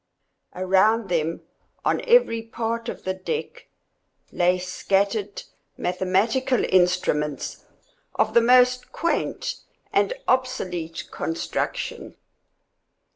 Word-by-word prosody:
Around 195 +4 +2
them, 165 -1 -1 0.4
on - - +2
every 475 - +4
part 230 +1 -3
of - - -7
the 185 - -1
deck, 320 - -5 0.6
lay 180 +1 +2
scattered 195 +3 -1 0.3
mathematical 195 +8 +1
instruments 175 -5 +1 0.5
of - - +1
the 235 - +6
most 250 +1 +4
quaint 335 +1 -2 0.4
and - - +2
obsolete 185 -11 -1
construction. 165 - -3
195 Hz, 85 wpm, -24 LUFS, 180-235 Hz, 0.6 s, the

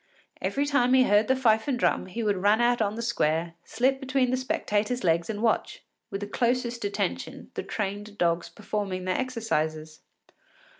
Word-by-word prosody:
Every 280 +1 0
time 260 -3 +3
he 260 - +6
heard 210 -2 +3
the 260 - +3
fife 220 -3 +2
and 270 -3 +1
drum 240 - +1
he 230 +5 -4
would 205 -2 +1
run 205 +4 +3
out 240 0 +3
on 210 0 0
the 230 - -4
square, 165 -7 0
slip 260 +3 +1
between 265 -2 +1
the - - +2
spectators’ 245 -1 -1
legs 170 +1 +2
and 215 0 -3
watch, 225 - 0 0.3
with 195 0 -5
the 205 - -4
closest 240 +1 0
attention, 205 0 -3
the - - -3
trained 205 0 -4
dogs 170 -2 +1
performing 200 -3 -4
their 185 - 0
exercises. 160 -11 -2
215 Hz, 180 wpm, -27 LUFS, 195-245 Hz, 0.3 s, he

